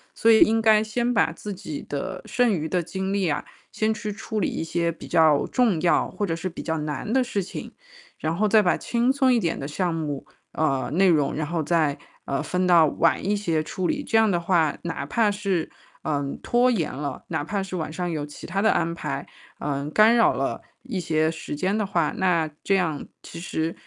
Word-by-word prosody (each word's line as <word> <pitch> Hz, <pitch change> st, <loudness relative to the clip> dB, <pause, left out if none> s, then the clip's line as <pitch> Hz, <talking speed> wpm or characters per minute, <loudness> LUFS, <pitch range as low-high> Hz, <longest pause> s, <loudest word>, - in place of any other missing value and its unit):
所 230 Hz, -, +3 dB
以 220 Hz, -, +7 dB
应 225 Hz, +1 st, +5 dB
该 215 Hz, -1 st, +5 dB
先 240 Hz, +3 st, -1 dB
把 165 Hz, -, +3 dB
自 205 Hz, +4 st, -7 dB
己 180 Hz, -6 st, -6 dB
的 185 Hz, +6 st, -4 dB
剩 245 Hz, -2 st, +2 dB
余 160 Hz, -4 st, -1 dB
的 175 Hz, +1 st, 0 dB
精 190 Hz, +3 st, -3 dB
力 190 Hz, -4 st, +1 dB
啊， 145 Hz, -, -2 dB, 0.3 s
先 220 Hz, 0 st, 0 dB
去 210 Hz, 0 st, -5 dB
处 215 Hz, 0 st, -4 dB
理 -, -, +1 dB
一 -, -, -4 dB
些 170 Hz, 0 st, 0 dB
比 165 Hz, -, -11 dB
较 155 Hz, -3 st, +4 dB
重 230 Hz, -10 st, +2 dB
要 175 Hz, -, +2 dB
或 205 Hz, -, -2 dB
者 165 Hz, -3 st, -1 dB
是 170 Hz, +3 st, -4 dB
比 170 Hz, -, -8 dB
较 160 Hz, -1 st, -2 dB
难 150 Hz, -, -3 dB
的 260 Hz, -1 st, +4 dB
事 205 Hz, -5 st, -2 dB
情， 185 Hz, -, -7 dB, 0.5 s
然 160 Hz, +1 st, -2 dB
后 215 Hz, +4 st, +1 dB
再 215 Hz, +1 st, +5 dB
把 180 Hz, -, +2 dB
轻 240 Hz, +2 st, +1 dB
松 265 Hz, -3 st, +3 dB
一 235 Hz, -, +3 dB
点 165 Hz, -5 st, -1 dB
的 135 Hz, -, -5 dB
项 170 Hz, +3 st, -1 dB
目， 150 Hz, -4 st, -4 dB, 0.3 s
呃， 135 Hz, -5 st, 0 dB
内 190 Hz, +3 st, +4 dB
容， 150 Hz, -5 st, +3 dB
然 150 Hz, -1 st, -2 dB
后 165 Hz, -1 st, -1 dB
再， 155 Hz, -3 st, +1 dB, 0.3 s
呃， 140 Hz, -, -2 dB
分 180 Hz, 0 st, 0 dB
到 170 Hz, -3 st, +6 dB
晚 165 Hz, +3 st, +1 dB
一 205 Hz, -, +1 dB
些 165 Hz, -7 st, 0 dB
处 180 Hz, +3 st, -3 dB
理。 290 Hz, -1 st, -1 dB
这 225 Hz, -, +1 dB
样 220 Hz, -1 st, +4 dB
的 175 Hz, -, +2 dB
话， 170 Hz, -3 st, +2 dB
哪 165 Hz, -1 st, -4 dB
怕 220 Hz, -3 st, +2 dB
是， 195 Hz, -5 st, -2 dB, 0.3 s
嗯， 145 Hz, -3 st, -2 dB
拖 245 Hz, +1 st, +3 dB
延 190 Hz, -11 st, 0 dB
了， 140 Hz, -1 st, -5 dB
哪 145 Hz, -, -2 dB
怕 200 Hz, 0 st, -2 dB
是 185 Hz, -1 st, -5 dB
晚 155 Hz, -1 st, -4 dB
上 175 Hz, 0 st, -2 dB
有 150 Hz, -2 st, -3 dB
其 145 Hz, -, -11 dB
他 195 Hz, +3 st, -1 dB
的 220 Hz, -, +4 dB
安 170 Hz, -1 st, 0 dB
排， -, -, -4 dB, 0.3 s
嗯， 145 Hz, 0 st, -3 dB
干 215 Hz, +7 st, +5 dB
扰 230 Hz, -, +5 dB
了 -, -, -2 dB, 0.2 s
一 235 Hz, -8 st, -4 dB
些 155 Hz, -1 st, +1 dB
时 160 Hz, -2 st, -6 dB
间 190 Hz, +7 st, 0 dB
的 210 Hz, -, 0 dB
话， 170 Hz, -5 st, 0 dB
那 170 Hz, -4 st, +2 dB
这 195 Hz, -, +2 dB
样 160 Hz, -6 st, -1 dB, 0.2 s
其 165 Hz, -, -9 dB
实， 165 Hz, -2 st, -2 dB
180 Hz, 240 characters per minute, -24 LUFS, 160-210 Hz, 0.5 s, 以